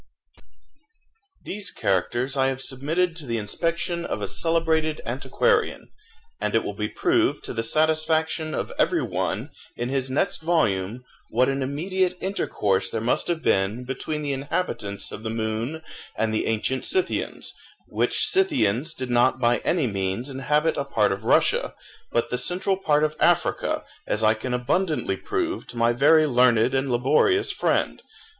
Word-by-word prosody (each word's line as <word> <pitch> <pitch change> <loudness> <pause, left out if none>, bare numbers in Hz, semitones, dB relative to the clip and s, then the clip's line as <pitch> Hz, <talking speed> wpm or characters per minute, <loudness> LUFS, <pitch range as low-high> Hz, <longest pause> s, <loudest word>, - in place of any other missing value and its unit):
These 205 0 -4
characters 120 +8 -1
I 135 -1 +3
have 135 -1 -2
submitted 160 +7 -1
to 150 -5 -9
the 115 -1 -1
inspection 170 - -2
of - - -3
a - - -3
celebrated 160 -2 +1
antiquarian, 440 - 0 0.5
and - - -1
it - - +3
will - - -4
be - - -3
proved 350 -1 +1
to - - -4
the 115 - -1
satisfaction 155 +4 +1
of - - -3
every - - +2
one, - - -2 0.3
in 120 +1 -2
his 135 -1 -1
next 130 - 0
volume, 120 - 0 0.3
what 125 +4 +2
an 135 0 -1
immediate 180 +7 -1
intercourse 100 - 0
there 115 - -2
must 115 +3 0
have 170 -2 -2
been 100 +6 +1
between 140 +4 -4
the 145 -1 -1
inhabitants 135 - -3
of - - -7
the 110 - -4
moon 115 +7 -3 0.3
and 110 -1 0
the 110 - 0
ancient 115 +4 -1
Scythians, 375 -1 -1 0.3
which - - +1
Scythians 160 - +1
did 130 -1 -4
not 120 +2 +3
by 120 -1 +3
any 165 -5 +1
means 100 +4 -2
inhabit 150 +4 +1
a 140 - 0
part 110 -7 +1
of 100 +3 -4
Russia, - - +2 0.4
but 120 - 0
the 125 - 0
central 185 +8 +1
part 150 -6 +2
of 155 0 0
Africa, - - +1 0.2
as 105 - 0
I 110 0 +5
can 120 +3 -5
abundantly 155 +7 0
prove 365 -3 -3
to 120 - -9
my 115 0 +3
very 155 +5 +5
learned 125 -3 +4
and 135 0 0
laborious 145 - +3
friend. - - 0
135 Hz, 160 wpm, -24 LUFS, 115-160 Hz, 0.5 s, I